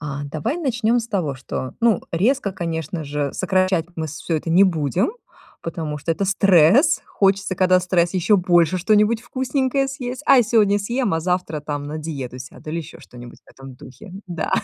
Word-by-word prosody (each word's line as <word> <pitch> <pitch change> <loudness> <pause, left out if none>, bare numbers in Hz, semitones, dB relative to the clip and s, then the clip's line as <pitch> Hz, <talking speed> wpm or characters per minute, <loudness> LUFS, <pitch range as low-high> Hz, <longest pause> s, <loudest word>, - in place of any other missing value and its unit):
А 145 -1 -5
давай 155 - -3
начнём 245 -5 +1
с 230 - -8
того, 180 -10 -1
что, 130 -1 -6
ну, 230 -4 +3
резко, 205 +5 +1
конечно 165 -2 -4
же, 145 -1 -3
сокращать 185 -3 +1
мы 160 -1 -3
всё 160 +2 -3
это 160 +2 -4
не 185 +4 +6
будем, 170 - 0 0.5
потому 160 -3 -4
что 165 +3 -1
это 195 - -2
стресс. 195 - +4
Хочется, 195 -1 +1
когда 185 0 +3
стресс, 175 -1 0
ещё 190 +3 +3
больше 175 -1 +3
что-нибудь 210 +4 +2
вкусненькое 260 +2 -1
съесть. 255 0 -6
А - - +7
я 250 - +6
сегодня 210 -3 +3
съем, 235 0 -1
а 165 - -1
завтра 180 -2 -2
там 145 -1 -5
на 150 +2 -5
диету 140 -5 -6
сяду 130 +4 -10
или 165 - -2
ещё 160 -1 -9
что-нибудь 120 0 -13
в - - -20
этом 135 -1 -12
духе. 130 +7 -13
Да. 170 -3 -4
180 Hz, 185 wpm, -21 LUFS, 155-210 Hz, 0.5 s, А